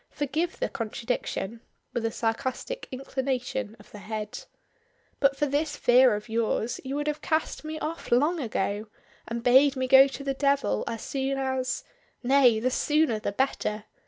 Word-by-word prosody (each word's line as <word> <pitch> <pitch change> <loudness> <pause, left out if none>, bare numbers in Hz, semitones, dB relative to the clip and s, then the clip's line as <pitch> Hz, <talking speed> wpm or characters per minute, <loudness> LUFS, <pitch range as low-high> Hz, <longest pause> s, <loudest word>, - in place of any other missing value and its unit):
Forgive 310 +5 -2
the - - 0
contradiction," 230 -1 -3 0.3
with 240 - -2
a - - -3
sarcastic 260 - -3
inclination 260 -3 -3
of - - -17
the 210 - -10
head. 210 +1 -5 0.7
"But 275 -1 +3
for 295 - +2
this 290 +2 -1
fear 245 -2 +5
of 210 +2 -6
yours 225 +1 -1
you 270 +1 -4
would 295 0 -1
have 300 0 -2
cast 315 -1 -1
me 310 0 -5
off 320 +2 -5
long 295 +8 +3
ago, 210 -4 -2 0.4
and 235 0 -4
bade 265 +3 +6
me 260 -1 -1
go 265 +1 +8
to 275 +1 -7
the 275 -1 -1
devil 275 - +1
as 230 - -4
soon 270 0 -2
as 260 -1 -1 0.4
nay, 250 -3 +5
the 255 +3 0
sooner 295 -4 +2
the 210 - -2
better. 210 -2 -1
260 Hz, 165 wpm, -27 LUFS, 230-280 Hz, 0.7 s, go